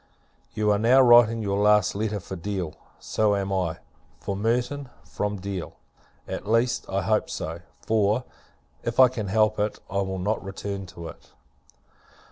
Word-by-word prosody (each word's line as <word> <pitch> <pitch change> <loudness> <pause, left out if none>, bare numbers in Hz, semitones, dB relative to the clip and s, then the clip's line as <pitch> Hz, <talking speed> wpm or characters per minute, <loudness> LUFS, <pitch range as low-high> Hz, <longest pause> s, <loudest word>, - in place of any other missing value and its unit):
You 105 -1 +2
are 100 - +2
now 120 +5 +5
writing 120 -3 +6
your 100 -1 0
last 105 -1 +4
letter 105 0 -2
for 95 +1 -7
Deal; 95 -2 -4 0.2
so 105 -2 +1
am 100 0 -2
I, 85 -3 -1 0.4
for 100 - -4
Merton, 125 +6 -1 0.2
from 105 0 -3
Deal: 95 -2 -5 0.5
at - - -5
least, 115 +2 +1
I - - -1
hope - - +1
so; 80 +2 -5 0.3
for, 110 +2 +2 0.6
if 115 +1 -3
I 130 -1 +9
can 115 -5 -4
help 110 +1 +2
it, 105 +1 -1
I 100 - -2
will 95 -1 -3
not 100 +4 -1
return 100 0 -5
to 85 -1 -9
it. - - -15
105 Hz, 160 wpm, -25 LUFS, 95-115 Hz, 0.6 s, I